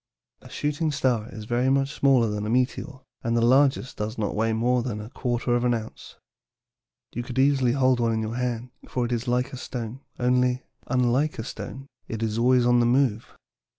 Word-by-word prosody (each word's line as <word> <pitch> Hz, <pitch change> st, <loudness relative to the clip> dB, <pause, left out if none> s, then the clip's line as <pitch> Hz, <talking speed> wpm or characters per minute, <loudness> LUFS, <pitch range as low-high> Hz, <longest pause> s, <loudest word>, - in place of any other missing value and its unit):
A -, -, -14 dB
shooting 150 Hz, +2 st, -1 dB
star 125 Hz, -6 st, 0 dB
is 110 Hz, -1 st, -8 dB
very 120 Hz, +3 st, +1 dB
much 135 Hz, +1 st, +1 dB
smaller 135 Hz, -5 st, +3 dB
than 105 Hz, 0 st, -3 dB
a -, -, -2 dB
meteor, 130 Hz, +3 st, -1 dB, 0.2 s
and 115 Hz, 0 st, 0 dB
the -, -, +2 dB
largest 130 Hz, 0 st, +3 dB
does 110 Hz, +3 st, -4 dB
not 105 Hz, -2 st, -1 dB
weigh 110 Hz, +1 st, +1 dB
more 120 Hz, +3 st, +1 dB
than 115 Hz, -3 st, -4 dB
a 105 Hz, +3 st, -8 dB
quarter 120 Hz, 0 st, -1 dB
of 120 Hz, -, 0 dB
an 120 Hz, -1 st, +2 dB
ounce. 110 Hz, -1 st, -8 dB, 1.0 s
You 120 Hz, -, -3 dB
could 125 Hz, +1 st, -7 dB
easily 135 Hz, -2 st, +3 dB
hold 130 Hz, -2 st, +3 dB
one 115 Hz, -1 st, +1 dB
in 110 Hz, 0 st, -1 dB
your 110 Hz, +1 st, -3 dB
hand, 125 Hz, -1 st, -3 dB, 0.2 s
for 125 Hz, -1 st, -1 dB
it 120 Hz, -, -4 dB
is 120 Hz, +1 st, -2 dB
like 125 Hz, +2 st, +1 dB
a -, -, -5 dB
small -, -, -8 dB
stone, 120 Hz, -1 st, -5 dB, 0.2 s
only, 125 Hz, 0 st, +1 dB, 0.2 s
unlike 130 Hz, +4 st, +1 dB
a 110 Hz, -, -3 dB
stone, 135 Hz, +2 st, -7 dB, 0.2 s
it 115 Hz, 0 st, -4 dB
is 110 Hz, 0 st, -1 dB
always 125 Hz, 0 st, +4 dB
on 120 Hz, 0 st, +4 dB
the 120 Hz, -, +3 dB
move. 120 Hz, -3 st, +2 dB
125 Hz, 210 wpm, -25 LUFS, 115-130 Hz, 1.0 s, always